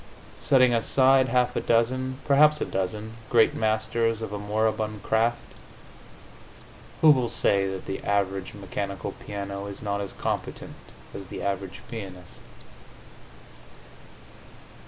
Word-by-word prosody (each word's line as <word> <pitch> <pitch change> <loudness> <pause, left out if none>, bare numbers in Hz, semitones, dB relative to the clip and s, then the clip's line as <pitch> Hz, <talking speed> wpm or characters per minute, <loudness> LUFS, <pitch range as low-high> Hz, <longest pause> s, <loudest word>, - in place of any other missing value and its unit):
Setting 130 -3 +4
aside 130 +3 +4
half 125 0 +1
a - - +1
dozen 130 +3 +1
perhaps 150 +2 +5
a - - -1
dozen 105 +4 -4
great 115 -2 +4
masters 110 +1 0
of 105 - -5
a 105 - -3
moribund 110 0 -1
craft, 115 +2 0 1.5
who 155 - +8
will 125 -4 +2
say 100 -2 +2
that 95 -1 -5
the 95 - -5
average 100 -1 -1
mechanical 100 -1 -4
piano 100 -1 -6
is 100 - -8
not 100 -1 -2
as 100 - -6
competent - - -4 0.4
as 100 -1 -8
the - - -7
average 100 -1 -4
pianist? 95 -6 -9
110 Hz, 120 wpm, -26 LUFS, 100-120 Hz, 1.5 s, who